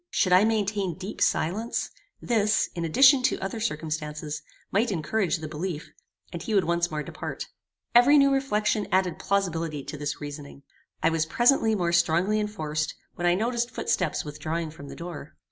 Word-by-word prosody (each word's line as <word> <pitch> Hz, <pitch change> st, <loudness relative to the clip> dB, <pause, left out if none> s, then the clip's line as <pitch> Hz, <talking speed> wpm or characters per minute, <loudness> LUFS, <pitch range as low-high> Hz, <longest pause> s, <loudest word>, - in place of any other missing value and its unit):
Should 185 Hz, -3 st, +2 dB
I 185 Hz, +3 st, +6 dB
maintain 205 Hz, -4 st, 0 dB
deep 190 Hz, +2 st, -7 dB
silence, 210 Hz, +9 st, 0 dB, 0.3 s
this, 215 Hz, -2 st, +1 dB
in 170 Hz, -, -4 dB
addition 260 Hz, -, +6 dB
to 255 Hz, -, +1 dB
other 195 Hz, +4 st, -4 dB
circumstances, 155 Hz, -5 st, -3 dB, 0.3 s
might 215 Hz, +4 st, +2 dB
encourage 185 Hz, +2 st, 0 dB
the 155 Hz, -1 st, -6 dB
belief, 155 Hz, +1 st, -5 dB, 0.4 s
and 170 Hz, -, -5 dB
he 220 Hz, -, -2 dB
would 195 Hz, -, +4 dB
once 170 Hz, +1 st, +1 dB
more 150 Hz, -1 st, -3 dB
depart. -, -, -6 dB, 0.4 s
Every 245 Hz, +5 st, +7 dB
new 275 Hz, -1 st, +5 dB
reflection 215 Hz, -6 st, 0 dB
added 185 Hz, -2 st, +1 dB
plausibility 165 Hz, -7 st, -1 dB
to 150 Hz, -, -7 dB
this 145 Hz, 0 st, -3 dB
reasoning. 145 Hz, -1 st, -8 dB, 0.4 s
It 165 Hz, -, +4 dB
was 160 Hz, -1 st, 0 dB
presently 240 Hz, +2 st, +3 dB
more 175 Hz, -3 st, 0 dB
strongly 170 Hz, +5 st, +2 dB
enforced, 155 Hz, -8 st, -2 dB, 0.2 s
when 175 Hz, -1 st, -1 dB
I 175 Hz, -, +4 dB
noticed 235 Hz, +3 st, 0 dB
footsteps 180 Hz, -10 st, -1 dB
withdrawing 155 Hz, +2 st, -4 dB
from 140 Hz, -3 st, -11 dB
the -, -, -9 dB
door. 170 Hz, -4 st, -8 dB
175 Hz, 165 wpm, -26 LUFS, 155-215 Hz, 0.4 s, Every